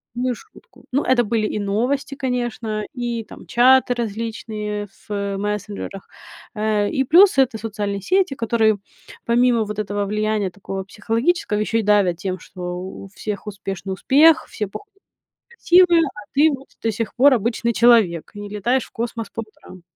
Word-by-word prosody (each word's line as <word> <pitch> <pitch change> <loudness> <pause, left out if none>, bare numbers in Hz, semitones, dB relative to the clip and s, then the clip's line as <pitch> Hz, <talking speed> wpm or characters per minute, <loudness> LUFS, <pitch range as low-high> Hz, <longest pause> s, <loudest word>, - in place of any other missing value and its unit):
злую 250 0 -1
шутку. 485 - -19
Ну 275 +3 +2
это 250 -2 +3
были 215 0 0
и - - -3
новости, 240 +8 -1
конечно, 240 -5 -2
и 240 -2 -3
там, - - -13
чаты 250 +1 +4
различные 215 -2 -4 0.2
в 200 -1 -3
мессенджерах, 205 -1 -4 0.5
э, 210 -1 +1
и 265 - +1
плюс- 360 +2 +6
это 255 -4 +3
социальные 205 -2 -4
сети, 370 - +1
которые, 220 -2 +2 0.5
помимо 235 -1 +3
вот 210 0 -5
этого 205 0 -2
влияния 210 -2 -1
такого 195 -1 -6
психологического, 225 - -1
еще 225 +2 0
и - - +1
давят 200 -4 +3
тем, 185 -1 -4
что 185 +1 -12 0.2
у 190 +1 -8
всех 210 0 -5
успешный 195 -2 -5
успех, 300 - +5
все 210 - -3
пох 410 - -9
и - - -31 0.6
красивые, 350 -4 +5
а 275 -8 -5
ты 300 +3 +5
вот 270 - -16
до 225 - 0
сих 220 +1 -4
пор 270 +2 +6
обычный 235 +1 0
человек 220 -9 +4
и 205 - -8
не 205 - -7
летаешь 235 +5 0
в - - -19
космос 230 -1 -4
по 225 - -5
утрам. 185 -4 -15
220 Hz, 165 wpm, -21 LUFS, 205-245 Hz, 0.6 s, плюс